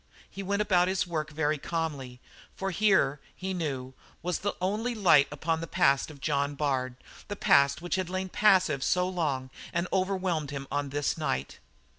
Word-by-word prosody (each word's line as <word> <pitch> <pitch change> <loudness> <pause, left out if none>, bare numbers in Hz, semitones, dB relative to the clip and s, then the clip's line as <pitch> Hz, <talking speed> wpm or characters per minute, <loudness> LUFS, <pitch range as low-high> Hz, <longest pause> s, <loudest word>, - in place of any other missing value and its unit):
He 195 - -8
went 200 +2 0
about 180 -3 +3
his 190 0 0
work 155 -3 -3
very 150 -1 0
calmly, 145 -7 -4 0.4
for 195 0 -3
here, 185 -8 +3 0.2
he 190 0 -4
knew, 135 -7 -3 0.3
was 180 0 -1
the 205 - -2
only 215 +6 -1
light 165 -9 +5
upon 160 +2 -1
the 165 - -5
past 140 -7 +2
of 150 -2 -12
John 140 0 0
Bard, 130 -3 -1 0.3
that 205 - -4
past 140 -3 +3
which 175 - -1
had 185 -2 -2
lain 185 +1 -2
passive 180 -9 +3
so 180 0 +2
long 145 -8 -2 0.2
and 170 +2 -1
overwhelmed 185 -5 0
him 140 -1 -5
on 145 0 -1
this 145 +3 -1
night. 70 - -2
165 Hz, 175 wpm, -29 LUFS, 140-185 Hz, 0.4 s, light